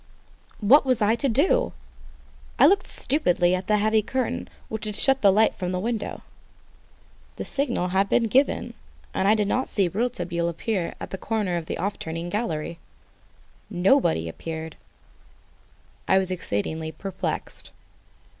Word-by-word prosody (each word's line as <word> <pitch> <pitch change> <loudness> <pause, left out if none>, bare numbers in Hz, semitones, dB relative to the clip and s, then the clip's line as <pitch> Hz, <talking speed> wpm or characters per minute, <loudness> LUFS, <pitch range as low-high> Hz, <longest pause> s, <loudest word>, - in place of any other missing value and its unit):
What 250 +9 +6
was 255 -3 +1
I 210 +1 +3
to 270 +4 0
do? 370 - +2 0.8
I - - +7
looked 395 0 +4
stupidly 180 - +1
at 185 +1 -2
the 210 - +3
heavy 215 +1 +2
curtain 255 +3 -3 0.2
which 220 0 -5
had 210 -1 -3
shut 270 +4 +5
the 200 - +6
light 215 +3 +4
from 180 -1 -4
the 180 - -1
window. 225 +2 -3 1.1
The - - -5
signal 245 -10 -1
had 195 +2 +1
been 240 - +3
given, 255 +5 +1 0.4
and 190 - 0
I 215 - +5
did 210 -2 0
not 260 +5 0
see 195 -3 +1
Rouletabille 175 -4 -2
appear 180 +1 -3
at - - -7
the 190 - -5
corner 210 -6 -1
of 165 -1 -4
the - - -3
off 200 +3 -3
turning 165 +2 -5
gallery. 170 -5 -3 0.9
Nobody 180 - +2
appeared. 160 - -6 1.3
I 190 - +4
was 190 -1 +1
exceedingly 160 - -3
perplexed. 190 +4 -5
200 Hz, 150 wpm, -25 LUFS, 175-230 Hz, 1.3 s, I